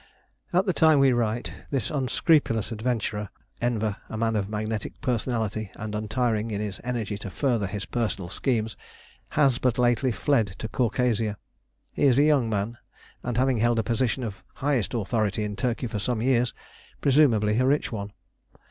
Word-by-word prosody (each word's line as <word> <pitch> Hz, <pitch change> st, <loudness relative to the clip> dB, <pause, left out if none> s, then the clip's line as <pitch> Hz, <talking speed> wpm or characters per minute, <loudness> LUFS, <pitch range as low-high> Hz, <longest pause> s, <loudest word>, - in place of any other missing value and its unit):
At 185 Hz, +2 st, +3 dB
the 185 Hz, -, +1 dB
time 160 Hz, -3 st, +5 dB
we 135 Hz, -2 st, +5 dB
write 120 Hz, 0 st, -1 dB, 0.2 s
this 135 Hz, -6 st, -1 dB
unscrupulous 130 Hz, -, +2 dB
adventurer, 110 Hz, -3 st, -2 dB, 0.3 s
Enver 110 Hz, -4 st, 0 dB
a 110 Hz, -, -5 dB
man 115 Hz, 0 st, +1 dB
of 100 Hz, -2 st, -1 dB
magnetic 110 Hz, 0 st, -3 dB
personality 110 Hz, -4 st, -1 dB
and 110 Hz, 0 st, -6 dB
untiring 110 Hz, +1 st, 0 dB
in 105 Hz, -2 st, -2 dB
his 105 Hz, -2 st, -4 dB
energy 115 Hz, -4 st, -3 dB
to 100 Hz, -, -6 dB
further 115 Hz, -1 st, 0 dB
his 95 Hz, 0 st, -4 dB
personal 105 Hz, -4 st, -2 dB
schemes 110 Hz, +2 st, -1 dB, 0.6 s
has 135 Hz, -5 st, +4 dB
but 125 Hz, -3 st, +1 dB
lately 125 Hz, +1 st, +3 dB
fled 110 Hz, -6 st, +1 dB
to -, -, -4 dB
Caucasia. 115 Hz, -3 st, 0 dB, 0.5 s
He -, -, +1 dB
is 130 Hz, -3 st, +5 dB
a 145 Hz, -, +6 dB
young 145 Hz, -6 st, +3 dB
man, 105 Hz, +3 st, -2 dB, 0.4 s
and 120 Hz, -1 st, -3 dB
having 130 Hz, -1 st, +3 dB
held 120 Hz, +1 st, +3 dB
a 115 Hz, -, +2 dB
position 125 Hz, +3 st, 0 dB
of 105 Hz, -4 st, -6 dB
highest 135 Hz, -6 st, 0 dB
authority 110 Hz, -1 st, 0 dB
in 105 Hz, -1 st, -3 dB
Turkey 125 Hz, +2 st, -1 dB
for 110 Hz, -3 st, -3 dB
some 115 Hz, +3 st, -1 dB
years, 125 Hz, 0 st, +2 dB, 0.5 s
presumably 120 Hz, -7 st, +4 dB
a 130 Hz, -, +3 dB
rich 145 Hz, +2 st, +1 dB
one. 100 Hz, -2 st, -4 dB
115 Hz, 165 wpm, -26 LUFS, 105-125 Hz, 0.6 s, a